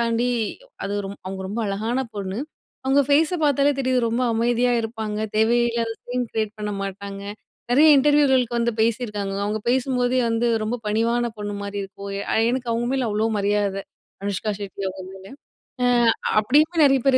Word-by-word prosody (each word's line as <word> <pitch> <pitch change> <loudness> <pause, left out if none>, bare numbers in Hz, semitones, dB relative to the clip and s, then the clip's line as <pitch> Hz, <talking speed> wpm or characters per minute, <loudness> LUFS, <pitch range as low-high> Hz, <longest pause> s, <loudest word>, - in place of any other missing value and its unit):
தாண்டி 235 +1 +1 0.6
அது 200 - -3
ஒரு 195 - -5 0.2
அவுங்க 190 0 -5
ரொம்ப 225 +4 -3
அழகான 220 +5 -1 0.2
பொண்ணு. 195 0 -4 0.5
அவுங்க 270 +2 +4
ஃபேஸ 305 +4 +3
பார்த்தாலே 285 0 +3
தெரியுது, 260 -1 +1
ரொம்ப 235 +3 0
அமைதியா 240 +2 +2
இருப்பாங்க. 220 -2 -4 0.2
தேவையில்லாத 235 +1 +2
சீன் 250 +1 -2
கிரியேட் 215 -2 -2
பண்ண 210 0 -3
மாட்டாங்க. 195 0 -6 0.5
நிறைய 290 +6 +6
இன்டர்வியூகளுக்கு 265 -4 +3
வந்து 235 0 +1
பேசியிருக்காங்க. 210 -4 -1
அவுங்க 210 +1 -1
பேசும்போதே 255 0 +1
வந்து 230 +1 +1 0.2
ரொம்ப 220 +3 -1
பணிவான 230 +3 +1
பொண்ணுமாரி 205 -1 -5
இருக்கும். 200 0 -9 0.2
அ - - +2 0.2
எனக்கு 245 -1 -2
அவுங்க 235 +1 -1
மேல 260 -3 0
அவ்ளோ 215 +2 +1
மரியாதை 200 -1 0 0.4
அனுஷ்கா 200 +1 -2
ஷெட்டி 200 -1 -7
அவுங்க 190 0 -7
மேல. 190 0 -13 0.6
அ - - +4 0.5
அப்பிடி 250 +7 +4 0.3
நிறைய 270 -1 +4
பேர் 265 -1 +5
230 Hz, 155 wpm, -23 LUFS, 205-250 Hz, 0.6 s, நிறைய